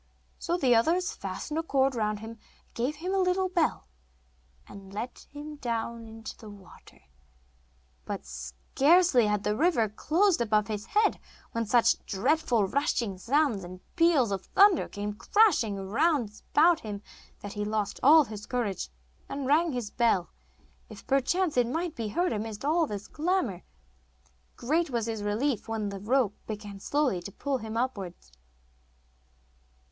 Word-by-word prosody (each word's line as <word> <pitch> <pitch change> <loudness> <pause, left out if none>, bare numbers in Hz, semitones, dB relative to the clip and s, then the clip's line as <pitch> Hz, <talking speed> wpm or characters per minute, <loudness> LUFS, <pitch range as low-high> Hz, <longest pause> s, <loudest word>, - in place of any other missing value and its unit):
So 345 0 -1
the 260 -7 +3
others 345 - +2
fastened 320 -7 -5
a - - +1
cord 270 -4 +1
round 215 -3 -1
him, 220 +1 -7
and 230 - -13 0.3
gave 255 +6 -1
him 360 +5 -4
a 390 - +2
little 370 +1 +1
bell, 345 -3 0 0.8
and 195 -1 -12
let 225 +5 -6
him 295 +1 -8
down 235 -2 -3
into 225 0 -9
the 220 - -12
water. 200 -2 -16 1.0
But - - -5
scarcely 240 - +2
had 210 -1 0
the 210 - 0
river 295 -6 +2
closed 330 - +2
above 215 -3 +2
his 210 0 -4
head 425 +1 +2 0.3
when 230 -1 -2
such 235 +2 +3
dreadful 235 +1 +1
rushing 235 -6 -1
sounds 260 -3 +1
and 180 +1 -9 0.2
peals 330 -10 +4
of 195 -2 -3
thunder 395 -3 +5
came 205 0 -4
crashing 295 - +3
round 220 - 0
about 330 +2 +5
him 205 -2 -7 0.4
that 205 - -7
he 210 - -3
lost 210 -1 -2
all 305 +4 +7
his 210 -4 -9
courage, 220 - -2 0.4
and 275 -1 -4
rang 315 +5 +3
his 245 -5 -4
bell, 225 -7 +1 0.6
if - - -12
perchance 295 +5 +1
it 245 -1 +4
might 325 +6 -2
be 230 -3 -3
heard 350 - 0
amidst 215 +2 -5
all 320 +2 +2
this 205 -3 -6
clamour. 315 - -1 0.9
Great 315 +6 0
was 235 -4 -1
his 225 -2 -3
relief 215 +4 -1
when 220 -2 -2
the 200 -1 -6
rope 225 0 +1
began 205 -2 -7
slowly 270 -6 0
to 200 - -8
pull 275 +5 -2
him 220 0 -5
upwards. 195 - -4
235 Hz, 155 wpm, -28 LUFS, 210-305 Hz, 1.0 s, all